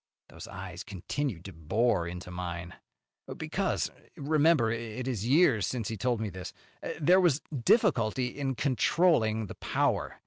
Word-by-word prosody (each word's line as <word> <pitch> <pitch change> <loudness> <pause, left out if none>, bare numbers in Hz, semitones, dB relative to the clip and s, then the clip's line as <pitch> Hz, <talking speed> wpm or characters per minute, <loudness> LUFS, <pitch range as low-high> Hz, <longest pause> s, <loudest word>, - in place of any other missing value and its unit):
Those - - -10
eyes 95 0 -7
continued 100 - -4
to 95 - -8
bore 85 +4 +1
into 90 +1 -7
mine. 90 -1 -5 0.6
"Because - - -1 0.3
remember 145 -4 +3
it 115 +2 -4
is 115 -4 -2
years 130 - +4
since 120 -5 -3
he 115 - -3
told 120 +3 0
me 110 -2 -3
this 95 0 -7 0.5
there 180 +5 +5
was 160 -5 +2 0.2
difficulty 130 - +3
in 135 +1 -3
controlling 125 -4 +2
the - - -8
power. - - -1
115 Hz, 140 wpm, -29 LUFS, 95-140 Hz, 0.6 s, there